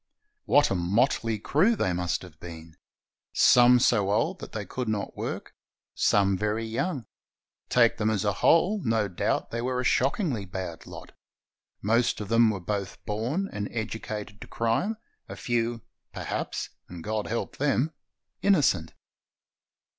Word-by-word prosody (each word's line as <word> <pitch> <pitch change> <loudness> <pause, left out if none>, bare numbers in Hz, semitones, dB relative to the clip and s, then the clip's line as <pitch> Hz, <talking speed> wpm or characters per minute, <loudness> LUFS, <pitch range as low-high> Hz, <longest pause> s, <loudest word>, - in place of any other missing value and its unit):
What 145 - +4
a - - +3
motley 110 +5 +1
crew 180 - +2
they 95 - 0
must 90 +1 -1
have 80 -4 -13
been! 80 -2 -10 0.6
Some 125 0 +6
so 105 -5 +3
old 105 +3 +1
that - - -9
they 105 -2 -4
could 125 +2 -4
not 105 -2 -2
work, - - -5 0.4
some 100 -1 +3
very 105 +3 -1
young. 130 - -2 0.6
Take 120 -2 +4
them 110 0 +1
as 105 -1 0
a 100 - +2
whole, 190 +5 +4
no 110 -3 +1
doubt 90 - -1
they 115 - -2
were 125 +1 -1
a - - -1
shockingly 135 - +1
bad 90 -3 -6
lot. - - -10 0.7
Most 115 +3 +2
of 105 -2 -6
them 115 0 +5
were 105 -3 -2
both 100 +2 -4
born 120 - -1
and 100 0 -3
educated 110 -2 -5
to - - -8
crime, 115 - 0 0.3
a - - -6
few, 120 -2 -1 0.3
perhaps - - -4
— - - -45
and 85 -2 -8
God 110 0 -2
help 115 +1 -3
them! 145 +2 +1 0.2
— - - -44
inno 195 -6 +4
cent. 80 -9 +1
110 Hz, 160 wpm, -27 LUFS, 100-125 Hz, 0.7 s, Some